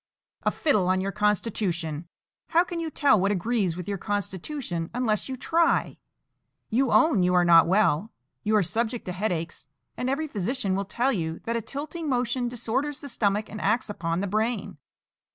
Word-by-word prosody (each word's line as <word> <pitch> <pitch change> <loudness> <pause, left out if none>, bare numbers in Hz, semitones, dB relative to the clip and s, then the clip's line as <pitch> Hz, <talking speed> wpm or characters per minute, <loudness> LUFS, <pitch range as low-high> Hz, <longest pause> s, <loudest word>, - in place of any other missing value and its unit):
"A - - +2
fiddle 210 - +1
on 185 0 +2
your 195 +1 -2
constitution! 190 -6 -1 0.4
How 340 +1 +4
can 350 -2 -5
you 330 -1 -2
tell 280 -8 +3
what 195 +2 +2
agrees 200 -3 0
with 180 - -6
your 200 -2 -3
constitution 200 - -3
unless 235 -2 0
you 260 - -4
try? 330 +5 +1 0.7
You 250 +3 +2
own 310 - +4
you 180 0 +3
are 180 -1 +4
not 170 -1 +7
well; 200 +1 +2 0.3
you 215 +1 +1
are 210 - +4
subject 225 +6 -1
to 180 - -3
headaches; 175 -6 -3 0.3
and 250 - -2
every 295 +4 -1
physician 210 -3 -1
will 200 +1 -1
tell 245 +7 0
you 165 -5 -2
that 230 - -2
a 230 - 0
tilting 300 +6 -5
motion 245 -1 0
disorders 250 +5 -2
the 285 - -7
stomach 210 -3 0
and 210 - -7
acts 215 +1 +1
upon 165 -2 -2
the - - -1
brain. 215 -4 -1
215 Hz, 180 wpm, -26 LUFS, 185-250 Hz, 0.7 s, not